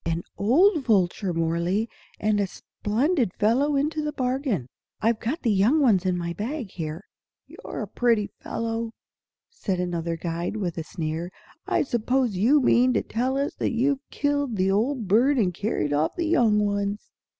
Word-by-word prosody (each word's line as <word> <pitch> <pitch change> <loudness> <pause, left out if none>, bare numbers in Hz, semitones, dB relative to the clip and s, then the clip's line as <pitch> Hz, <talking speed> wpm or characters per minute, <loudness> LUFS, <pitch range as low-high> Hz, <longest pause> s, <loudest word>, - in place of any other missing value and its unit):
"An 165 +1 -2
old 310 - +3
vulture, 195 -4 +1
Mohrle, 170 +6 0 0.3
and 210 -1 +1
a 200 - +1
splendid 235 - -1
fellow 265 +8 +2
into 300 +3 0
the 300 0 -2
bargain! 255 - -1 0.3
I've 225 0 +1
got 285 +10 -3
the 230 - +2
young 210 +10 +3
ones 210 -10 +3
in 180 -1 +1
my 170 -1 -3
bag 225 - -4
here." 160 +1 -5 0.4
"You're - - -8
a - - -6
pretty 230 -4 +1
fellow!" 230 0 -3 0.6
said 195 - -3
another 170 -2 -2
guide, 170 +4 -3
with 175 -5 -3
a - - -3
sneer. 160 +1 -4 0.4
"I - - +2
suppose 245 -2 0
you 240 +11 +4
mean 250 0 +4
to - - +1
tell 255 +4 -1
us 280 +1 -1
that - - 0
you've 270 +4 +1
killed 285 -4 -1
the 190 0 +2
old 230 +2 0
bird 250 +9 +4
and 190 -7 +2
carried 175 -6 -1
off 150 +2 +1
the 345 - -1
young 240 -10 +3
ones?" 200 0 -2
220 Hz, 170 wpm, -25 LUFS, 180-265 Hz, 0.6 s, you